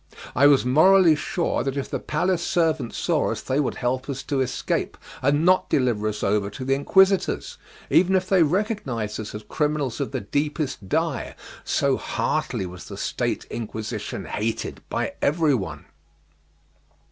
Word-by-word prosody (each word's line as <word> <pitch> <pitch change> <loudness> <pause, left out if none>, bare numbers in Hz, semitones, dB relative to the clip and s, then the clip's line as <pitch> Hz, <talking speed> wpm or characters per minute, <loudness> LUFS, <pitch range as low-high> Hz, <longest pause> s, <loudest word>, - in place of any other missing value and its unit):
I 140 +4 +6
was 140 -3 +4
morally 165 +5 +6
sure 170 +3 -1
that 135 +1 -2
if 140 - -2
the - - -3
palace 180 -1 0
servants 160 -9 0
saw - - +1
us - - -4
they 130 +2 0
would 145 - 0
help 130 +2 -2
us 135 -1 -4
to 140 -2 -1
escape, 125 -1 -2 0.2
and 145 +4 +2
not 185 +1 +4
deliver 120 -5 +1
us 105 0 -3
over 100 0 +1
to 130 +5 -7
the 135 - +2
Inquisitors, 190 +7 +2 0.3
even 185 +2 +4
if 185 0 +1
they 190 -2 +4
recognized 155 - -1
us 110 -1 -6
as 105 - -6
criminals 150 -5 -1
of 140 - -2
the 130 -3 -3
deepest 145 - -2
dye; 160 -4 -1 0.3
so - - +1
heartily 95 - -2
was 90 0 -9
the - - -8
State - - -2
Inquisition 110 -1 -5
hated 110 +2 -3
by - - -2
everyone. 135 - 0
140 Hz, 160 wpm, -24 LUFS, 120-165 Hz, 0.3 s, I